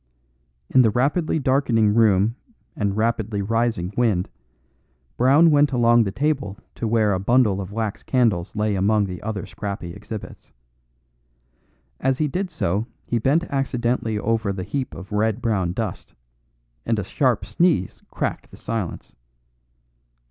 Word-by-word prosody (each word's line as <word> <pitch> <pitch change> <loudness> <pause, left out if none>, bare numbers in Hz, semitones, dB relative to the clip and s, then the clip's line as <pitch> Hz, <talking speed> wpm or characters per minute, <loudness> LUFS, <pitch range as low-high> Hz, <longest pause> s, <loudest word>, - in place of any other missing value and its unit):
In 130 - +6
the 115 - +4
rapidly 145 - +1
darkening 130 -7 +2
room 110 0 +3 0.4
and 100 -1 -1
rapidly 110 -2 0
rising 115 -4 -1
wind, 105 -7 +1 0.8
Brown 145 +7 +5
went 145 0 +4
along 120 -2 +4
the 100 - -2
table 135 -3 -1 0.2
to 115 - -3
where 110 -2 +2
a 95 - 0
bundle 105 -1 +2
of 95 0 -7
wax 110 -1 -3
candles 110 -9 0
lay 105 0 0
among 100 +2 +2
the 90 -2 -6
other 105 -4 -4
scrappy 100 -4 -6
exhibits. 105 +2 -9 1.5
As 135 -1 +1
he 155 - +1
did 185 +7 -2
so 105 - -1 0.2
he 120 - 0
bent 140 +9 +2
accidentally 125 -6 -1
over 110 -1 0
the 95 -1 -4
heap 130 +8 -4
of 95 +2 -10
red 110 +2 +1
brown 105 -8 0
dust; - - -5 0.7
and 115 -1 0
a 105 - -1
sharp 120 +1 0
sneeze 110 - +1
cracked - - -3
the - - -14
silence. 110 -6 -5
110 Hz, 140 wpm, -23 LUFS, 100-125 Hz, 1.5 s, In